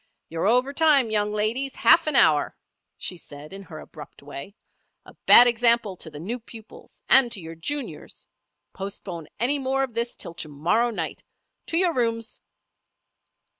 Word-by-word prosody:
"You're 165 +4 -2
over 250 +5 +2
time, 285 -7 +3
young 210 -1 0
ladies, 225 +6 -2
half 325 -1 +4
an 305 - 0
hour," 150 -9 +3 0.4
she 180 - -4
said 150 0 -12
in 195 - -8
her 160 -5 -11
abrupt 150 -2 -13
way. 145 +7 -9 0.5
"A - - -15
bad 245 - +10
example 235 -4 +2
to 160 - -6
the 150 -1 -10
new 225 +10 -5
pupils, 225 -1 -14
and 260 -3 +6
to 220 - -2
your 165 -1 -9
juniors. 275 - -6 0.5
Postpone 190 -4 -7
any 270 +6 +1
more 270 0 -1
of 260 -3 -5
this 235 +1 -3
till 170 - -7
to 155 -2 -6
morrow 180 +12 0
night. 230 - -5 0.5
To 330 - -1
your 355 -1 +2
rooms!" 230 -2 -2
225 Hz, 165 wpm, -24 LUFS, 170-250 Hz, 0.5 s, bad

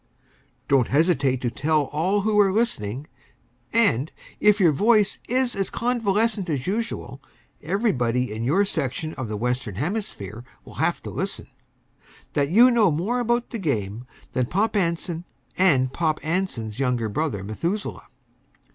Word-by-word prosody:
Don't 135 -4 +3
hesitate 140 -4 +2
to 120 - -1
tell 155 +2 +1
all 170 +9 0
who 210 0 +2
are 200 -2 +5
listening 140 - -1 0.7
and, 195 - +2 0.3
if 210 0 +4
your 175 -5 +5
voice 210 +6 +3
is 255 0 +2
as 195 -1 -1
convalescent 225 -4 0
as 140 -4 -2
usual, 200 - -3 0.4
everybody 125 - 0
in 110 +1 -4
your 175 +12 +3
section 155 -2 -3
of 130 -4 -5
the 105 0 -4
Western 125 -2 -2
Hemisphere 125 - -4 0.2
will - - -12
have - - 0
to - - -6
listen - - -4 0.9
that 140 -1 +1
you 235 +8 +7
know 225 -5 +4
more 185 +11 0
about 240 0 0
the 230 - -4
game 115 - -2 0.3
than 125 -1 0
Pop 215 - 0
Anson 170 -2 -1 0.3
and 135 -9 +3
Pop 155 -2 0
Anson's 155 - -2
younger 125 -4 0
brother, 110 -3 -2
Methuselah. 170 - -3
160 Hz, 145 wpm, -24 LUFS, 125-205 Hz, 0.9 s, you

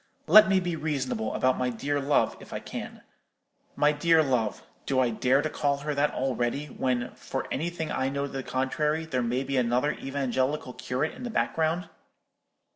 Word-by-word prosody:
Let 215 -1 +8
me 190 -1 +4
be 175 -2 -2
reasonable 135 -8 -2
about 130 +2 +2
my 125 0 +1
dear 140 +5 -1
love, 140 +1 +2
if - - -11
I - - -2
can. - - -8 0.7
My 150 0 +4
dear 160 +2 +4
love—do 125 +1 -2
I 125 -2 +3
dare 130 +5 +2
to 155 - -1
call 140 -1 0
her 150 +1 -3
that 145 +1 +1
already, 130 +2 -1
when, 125 -3 -2
for - - -5
anything 165 +1 -2
I 130 0 0
know 140 +1 -2
to 140 - -7
the 135 - -2
contrary, 150 +5 -1
there 130 -6 -1
may 125 +2 0
be 135 0 -2
another 125 +4 +2
evangelical 135 0 -2
curate 130 +6 -2
in - - -11
the 245 - -4
background? 165 -4 0
140 Hz, 180 wpm, -27 LUFS, 130-150 Hz, 0.7 s, Let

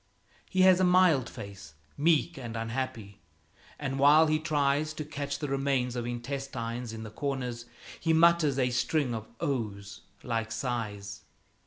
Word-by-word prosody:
He 185 - +1
has 185 -1 +6
a - - +3
mild 180 -8 +4
face, 100 -6 -10 0.2
meek 165 +2 +2
and 120 -4 -7
unhappy, 115 -3 -4 0.6
and 135 -2 -3
while 150 +3 +7
he 155 0 +1
tries 155 0 0
to 155 - -5
catch 145 -2 -4
the 150 - -4
remains 135 -2 0
of 120 -1 -3
intestines 120 -1 -4
in 110 0 -7
the 110 - -8
corners, 125 -2 -3 0.3
he 165 - +1
mutters 160 -3 +4
a 125 -2 +2
string 125 +2 0
of 110 -1 -5
"Oh's!" 100 -6 -3 0.2
like 115 -2 -2
sighs. 110 -5 -4
130 Hz, 150 wpm, -29 LUFS, 115-150 Hz, 0.6 s, while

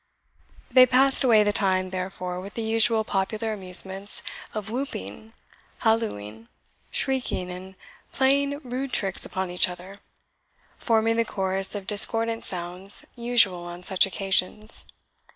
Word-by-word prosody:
They 255 0 +7
passed 265 +2 +4
away 225 -4 +5
the 205 - +1
time, 185 -3 0
therefore, 185 -1 -5
with 195 +2 -10
the 230 - -3
usual 220 0 +2
popular 215 +3 -2
amusements 190 0 0 0.3
of 215 -1 -6
whooping, 220 - -6 0.5
hallooing, 115 - -2 0.4
shrieking, 250 -9 -1
and 185 +1 -10 0.4
playing 280 +2 +1
rude 255 +1 -5
tricks 195 -2 +1
upon 190 -1 -4
each 180 +1 +2
other, 180 +3 -11 0.8
forming 225 -1 +1
the 230 - +3
chorus 195 -2 0
of 200 -2 -6
discordant 225 +3 +3
sounds 180 +2 +1
usual 230 -8 +2
on 175 +1 -9
such 190 0 +2
occasions. 195 +3 -2
200 Hz, 125 wpm, -24 LUFS, 185-230 Hz, 0.8 s, They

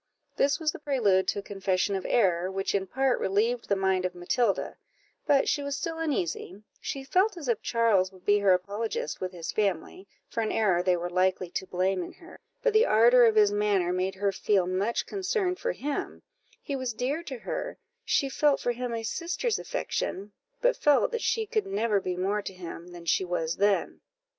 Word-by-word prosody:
This 280 +3 +2
was 315 -2 +1
the - - -10
prelude 230 -11 +2
to - - 0
a - - -2
confession 195 -1 -1
of 190 - -3
error, 185 -6 +2
which 195 0 -2
in 195 -1 0
part 265 +4 +1
relieved 225 +5 0
the 200 - +3
mind 190 -1 +1
of 180 -1 -2
Matilda: 195 +5 0 0.5
but 285 -2 +4
she 290 - +1
was 280 -1 -3
still 325 +1 -4
uneasy 205 - -2 0.2
she 275 - -5
felt 370 +8 +2
as 300 -6 -7
if 235 -3 0
Charles 220 -6 +2
would 185 -1 -18
be 205 0 +4
her 200 -1 +4
apologist 200 0 -2
with 185 -1 -3
his 170 -3 -5
family, 195 -1 -2 0.2
for 230 - -3
an 220 - -1
error 190 -6 +2
they 180 -1 +2
were 175 +1 -3
likely 185 0 0
to 190 - -4
blame 185 +1 0
in 175 - -7
her; 345 - -15 0.2
but - - +2
the 435 +1 +6
ardour 240 +3 +6
of 225 -1 +3
his 210 -1 +5
manner 205 -4 +1
made 185 +1 -1
her 200 +1 0
feel 195 -1 +1
much 190 +6 -1
concerned 380 -1 -1
for - - -1
him 290 - -4 0.4
he 280 - -3
was 260 -3 -3
dear 265 +8 -2
to 280 -7 -7
her - - -5 0.3
she 290 -10 +1
felt 285 +1 +2
for 245 - 0
him 240 0 -3
a 225 - -4
sister's 355 - -2
affection, 205 - -3 0.3
but - - +3
felt 295 - +3
that 470 -2 -2
she 445 -1 0
could 435 -2 -1
never 230 - +1
be 185 -1 -3
more 200 +3 0
to 195 - -7
him 170 -1 -8
than 175 -1 -11
she 170 - +2
was 170 -3 -2
then. 200 0 +1
210 Hz, 205 wpm, -28 LUFS, 185-275 Hz, 0.5 s, the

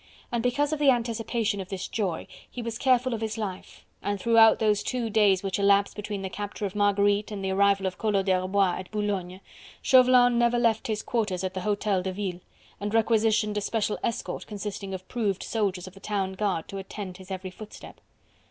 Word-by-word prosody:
And 235 -1 0
because 285 +5 +1
of 310 - -2
the 290 -2 +5
anticipation 230 -3 0
of 185 - -9
this 190 -3 -4
joy, 190 -7 -2 0.2
he 245 - -6
was 230 0 -4
careful 255 -1 +3
of 225 - -3
his 220 -1 -3
life, 195 -4 -6 0.2
and 205 -1 -2
throughout 225 +1 +6
those 210 -2 +2
two 240 -3 -2
days 200 -3 +4
which 195 0 -2
elapsed 200 0 +3
between 205 -1 -5
the - - -2
capture 205 +1 -5
of 195 - -4
Marguerite 205 0 +2
and 200 -2 -5
the 190 - 0
arrival 195 0 +3
of 185 - -3
Collot 205 -3 +1
d'Herbois 185 0 +1
at 185 - -8
Boulogne, 195 -3 -3 0.4
Chauvelin 250 -2 +6
never 240 0 +3
left 230 -2 +1
his 215 -2 -2
quarters 210 -6 -1
at 185 0 -2
the 185 - -4
Hotel 205 -1 0
de 190 +1 -3
Ville, 185 -2 -4 0.4
and 205 +2 -3
requisitioned 220 -1 +2
a - - 0
special 210 0 -1
escort 230 - -3
consisting 200 -2 -5
of 185 0 -10
proved 210 -6 -1
soldiers 195 -5 -1
of 185 - -11
the 195 - -14
town 195 -2 -2
guard 190 -4 -1
to 195 - -6
attend 190 -1 -7
his 190 0 -13
every 185 -1 -5
footstep. 210 +3 -12
205 Hz, 200 wpm, -27 LUFS, 195-225 Hz, 0.4 s, throughout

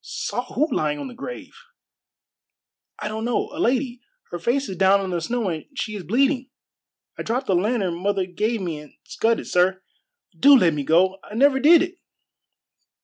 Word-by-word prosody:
"Saw 245 +1 -5
who 300 +5 +2
lying 150 -8 0
on 145 - -6
the - - -10
grave?" 275 - -9 1.4
"I 210 - -5
don't 220 +1 -4
know. 240 +1 -1
A 300 - -7
lady. 250 -3 0 0.3
Her 175 - -5
face 260 +9 0
is 190 - -5
down 195 +2 +4
in 190 -1 -4
the 175 -1 -2
snow, 235 +5 -2
and 160 -3 -5
she 215 -5 -4
is 200 - -5
bleeding. 260 - +1 0.7
I - - -2
dropped 250 +4 -2
the 195 - +1
lantern 190 -2 0
mother 200 -1 0
gave 215 +5 -2
me 165 -5 -4
and 150 -1 -14
scudded, 230 +1 -1
sir. 185 +1 +1 0.5
Do 280 0 +7
let 175 -8 +3
me 145 -1 -3
go! 185 +6 +2
I 210 - -11
never 265 +2 +4
did 320 +4 +6
it!" 360 +1 -7
215 Hz, 185 wpm, -23 LUFS, 180-255 Hz, 1.4 s, Do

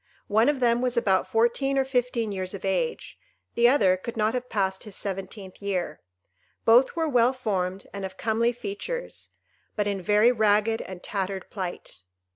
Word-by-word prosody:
One 220 +5 +4
of 285 -3 -1
them 235 0 +3
was 250 -1 -1
about 195 -5 +2
fourteen 240 +5 +1
or 270 - +2
fifteen 245 -4 0
years 185 0 -3
of 195 - -7
age; 470 - -2 0.3
the 235 0 +4
other 195 -9 +4
could 230 +5 -7
not 215 +1 +1
have 250 0 -3
passed 190 -2 -1
his 210 -3 -7
seventeenth 195 0 -6
year. 185 -6 -3 0.6
Both 245 +6 +5
were 325 -1 0
well 250 -3 +3
formed, 195 -6 -2
and 200 -1 -5
of 190 0 -6
comely 230 +2 +1
features, 245 - -6 0.5
but 210 - 0
in 200 -2 -2
very 210 +6 +4
ragged 215 0 +2
and 185 -1 -9
tattered 195 -1 -3
plight. 185 - -6
215 Hz, 170 wpm, -26 LUFS, 195-245 Hz, 0.6 s, Both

